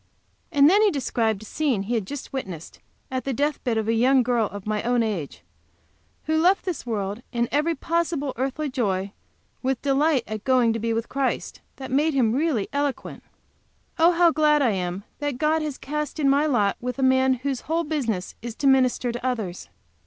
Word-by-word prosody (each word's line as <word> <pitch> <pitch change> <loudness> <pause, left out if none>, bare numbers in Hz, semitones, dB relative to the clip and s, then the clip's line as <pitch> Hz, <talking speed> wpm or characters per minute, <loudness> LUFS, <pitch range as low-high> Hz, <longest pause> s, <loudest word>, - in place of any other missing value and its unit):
And 285 -3 +6
then 395 +6 +5
he 430 - +5
described 230 - -1
a - - -10
scene 255 -5 -1
he 220 +5 -3
had 220 -5 -1
just 285 +2 -7
witnessed 185 - -6 0.3
at 260 0 -2
the 270 - -2
deathbed 280 -4 0
of 220 -1 -1
a 225 - +2
young 255 +3 +4
girl 235 -3 +1
of 205 -1 -9
my 210 -1 -1
own 240 0 +1
age, 195 -10 -4 0.8
who 315 0 +1
left 370 +3 +3
this 355 -9 -4
world 205 -1 -3
and 235 -1 0
every 305 +4 +1
possible 325 -5 -1
earthly 275 +5 -2
joy, 200 -7 -1 0.5
with 265 0 0
a - - -42
delight 280 -1 +2
in 215 - -6
the - - -2
going 245 0 +3
to 225 - -3
be 230 +1 -1
with 225 0 -1
Christ, 275 -1 -2
that 265 -2 -8
made 295 +3 +2
him 230 -5 +3
really 275 -7 0
eloquent. 285 -1 -2 0.8
Oh, 335 +2 +6
how 340 0 +5
glad 300 -2 +3
I 240 - +3
am 185 0 -3 0.2
that 290 -3 -2
God 310 +3 +1
has 300 -3 -4
cast 300 +2 -4
in 285 - +2
my 285 +3 +3
lot 210 -8 +1
with 250 +2 -4
a 270 - -1
man 260 0 +4
whose 260 0 -3
whole 330 +2 -1
business 245 - -2
is 235 -1 -6
to 280 - -4
minister 255 -2 +3
to 240 +1 -6
others! 220 -9 -3
260 Hz, 205 wpm, -24 LUFS, 225-295 Hz, 0.8 s, And